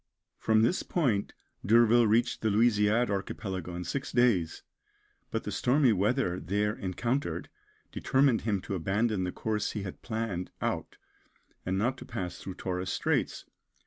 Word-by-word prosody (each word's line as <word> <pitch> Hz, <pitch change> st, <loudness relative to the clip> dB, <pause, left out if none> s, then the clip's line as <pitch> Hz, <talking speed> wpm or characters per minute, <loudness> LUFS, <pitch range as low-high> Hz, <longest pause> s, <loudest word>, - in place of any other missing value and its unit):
From 110 Hz, 0 st, +3 dB
this 175 Hz, +11 st, +2 dB
point 120 Hz, -, 0 dB, 0.3 s
D'Urville 115 Hz, +2 st, +5 dB
reached 115 Hz, +3 st, +2 dB
the 110 Hz, -, +1 dB
Louisiade 110 Hz, +1 st, +3 dB
Archipelago 95 Hz, -3 st, -4 dB
in 90 Hz, -, -4 dB
six 140 Hz, +8 st, -4 dB
days, 115 Hz, -10 st, +2 dB, 0.7 s
but -, -, -2 dB
the -, -, -4 dB
stormy 130 Hz, -1 st, +3 dB
weather 100 Hz, -2 st, +1 dB
there 105 Hz, +4 st, 0 dB
encountered 115 Hz, -, -2 dB, 0.4 s
determined 135 Hz, -3 st, +2 dB
him 105 Hz, -4 st, -1 dB
to 100 Hz, -, -5 dB
abandon 95 Hz, +2 st, 0 dB
the 90 Hz, -, -2 dB
course 105 Hz, +1 st, -2 dB
he 105 Hz, -, -3 dB
had 95 Hz, -, -7 dB
planned 110 Hz, -6 st, -3 dB
out, -, -, -3 dB, 0.7 s
and 95 Hz, +1 st, 0 dB
not 125 Hz, +6 st, 0 dB
to -, -, -9 dB
pass 90 Hz, -2 st, -5 dB
through 95 Hz, -, -7 dB
Torres 95 Hz, 0 st, -3 dB
Straits. -, -, -1 dB
105 Hz, 145 wpm, -29 LUFS, 95-120 Hz, 0.7 s, D'Urville